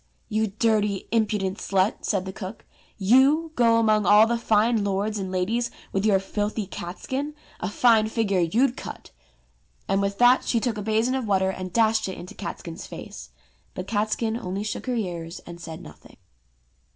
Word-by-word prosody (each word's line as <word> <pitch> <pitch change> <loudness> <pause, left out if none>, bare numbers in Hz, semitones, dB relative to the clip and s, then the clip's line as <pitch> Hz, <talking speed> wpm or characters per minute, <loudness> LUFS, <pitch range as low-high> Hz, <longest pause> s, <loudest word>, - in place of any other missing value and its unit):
You 220 0 +1
dirty 210 -1 0
impudent 210 -4 0
slut," 195 +2 0
said 195 -3 0
the 190 - -6
cook, 195 +1 -8 0.3
"you 270 +10 +4
go 230 -4 +4
among 215 -3 +3
all 210 +2 +7
the 235 +1 0
fine 225 -1 +2
lords 200 +2 -1
and 190 -1 -4
ladies 220 +6 0 0.2
with 195 +2 0
your 200 -2 +5
filthy 205 +2 -2
catskin.? 260 +13 -5 0.2
A 180 - -2
fine 220 0 +4
figure 215 -4 0
you'd 235 +10 +2
cut - - -9 0.4
!" - - -39
and 195 0 +1
with 200 0 -1
that 245 +1 +5
she 235 - +1
took 225 -2 -2
a - - -3
basin 220 +4 +1
of 260 -4 -2
water 190 -1 +2
and 185 -1 -6
dashed 220 -1 +2
it 190 - -6
into 180 - -9
Catskin's 165 0 -7
face. - - -9 0.5
But 185 - -4
Catskin 220 +2 -1
only 195 -2 -4
shook 215 - -5
her 250 - 0
ears 175 -5 -4
and 170 0 -10
said 165 +1 -8
nothing. - - -15
210 Hz, 175 wpm, -25 LUFS, 190-230 Hz, 0.5 s, all